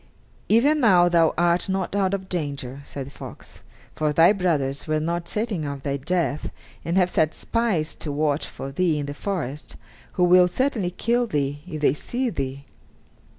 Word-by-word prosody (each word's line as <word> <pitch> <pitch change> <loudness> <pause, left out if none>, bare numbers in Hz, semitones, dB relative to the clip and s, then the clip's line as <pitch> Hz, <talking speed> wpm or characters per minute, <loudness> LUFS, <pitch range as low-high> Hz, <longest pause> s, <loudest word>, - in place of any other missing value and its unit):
"Even 280 +8 +4
now 185 -9 +5
thou 170 -2 +4
art 175 +2 +2
not 190 0 -1
out 195 -1 +2
of 190 -1 -7
danger," 140 -6 -4
said 140 -1 -7
the 140 - -11
fox, - - -11 0.3
"for 155 -1 0
thy 165 +6 +6
brothers 150 -8 -1
were 155 0 +1
not 170 +2 -2
certain 210 -6 -2
of 140 -2 -5
thy 140 -1 -1
death, 150 0 -1 0.3
and 170 +3 -1
have 180 -2 +4
set 160 -3 +1
spies 215 -10 0
to 150 - -5
watch 150 0 0
for 135 - -7
thee 165 +1 +1
in 145 - -2
the 145 - -5
forest, 150 -5 -4 0.4
who 180 - +1
will 180 0 +6
certainly 220 -1 0
kill 235 +6 0
thee 145 -6 -1
if 155 -4 -6
they 140 - +4
see 245 - -3
thee." 135 -3 -4
170 Hz, 180 wpm, -24 LUFS, 145-190 Hz, 0.4 s, thy